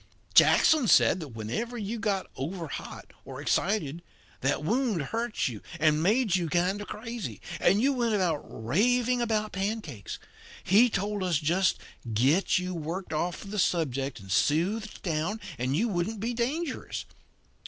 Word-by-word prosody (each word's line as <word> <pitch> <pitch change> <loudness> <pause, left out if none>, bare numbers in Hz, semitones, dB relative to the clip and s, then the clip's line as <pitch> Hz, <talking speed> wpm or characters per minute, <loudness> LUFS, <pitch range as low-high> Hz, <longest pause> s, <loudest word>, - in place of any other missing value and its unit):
Jackson 305 -7 +6
said 190 - +5
that 160 - -6
whenever 125 - -4
you 220 +1 -4
got 205 -3 0
overhot 165 +2 -6
or - - -8
excited 175 -5 0 0.4
that 140 +3 0
wound 230 - +1
hurt 230 +10 -1
you 115 -5 -5 0.2
and 155 0 +3
made 210 +2 +3
you 175 -3 0
kind 180 +4 +1
of 205 - -7
crazy, 230 0 -6 0.2
and 195 +4 +4
you 280 +1 +3
went 235 -5 +1 0.2
raving 240 - +1
about 215 -2 0
pancakes. 195 - -4 0.5
He 220 +6 +5
told 205 0 -2
us 180 -4 +2
to 150 - -7
just 185 +4 +2 0.3
get 135 - +3
you 180 0 -2
worked 170 +2 -4
off 170 +3 -2
of 200 - -9
the 210 - -2
subject 140 -8 0
and 95 -2 -10
soothed 185 - +1
down, 170 +5 -1 0.2
and 130 +3 0
you 225 +9 +2
wouldn't 200 +2 -2
be 230 +4 -2
dangerous. 265 +6 -3
190 Hz, 155 wpm, -28 LUFS, 155-225 Hz, 0.5 s, Jackson